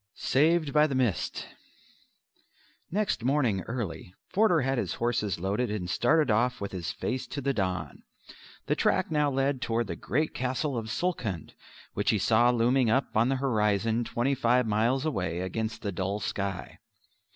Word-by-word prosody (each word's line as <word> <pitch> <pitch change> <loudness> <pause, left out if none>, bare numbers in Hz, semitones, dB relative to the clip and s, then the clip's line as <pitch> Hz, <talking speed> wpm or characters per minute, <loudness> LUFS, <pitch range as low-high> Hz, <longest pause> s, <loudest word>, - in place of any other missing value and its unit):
Saved 155 +1 +2
by 150 0 +5
the 140 - -3
Mist 125 -8 -1 1.4
Next 205 - -1
morning 125 -7 +1
early, 105 -6 -5
Forder 195 -5 +3
had 135 0 0
his - - -2
horses 115 -6 -1
loaded 100 +7 -1
and 105 -4 -3
started 150 - +2
off 120 +4 +1
with 100 - -4
his 85 -3 -4
face 130 0 -3
to - - -5
the 140 0 0
dawn. 90 - -3 0.6
The - - +1
track - - +1
now 150 -1 +2
led 135 -1 0
toward 115 -1 0
the 85 - -5
great 150 - -1
Castle 130 +3 -2
of 115 -2 -3
Sulkhund, 115 - -3 0.4
which - - 0
he - - +3
saw 120 +2 +4
looming 125 +1 +3
up 130 +4 0
on 115 +3 +3
the 135 - +2
horizon 115 -3 +1
twenty 120 +4 0
five 125 -1 +2
miles 115 +6 +1
away, 90 - -2
against 110 +4 -3
the 100 - -2
dull 95 +3 -2
sky. 100 -2 -4
120 Hz, 165 wpm, -28 LUFS, 105-135 Hz, 1.4 s, by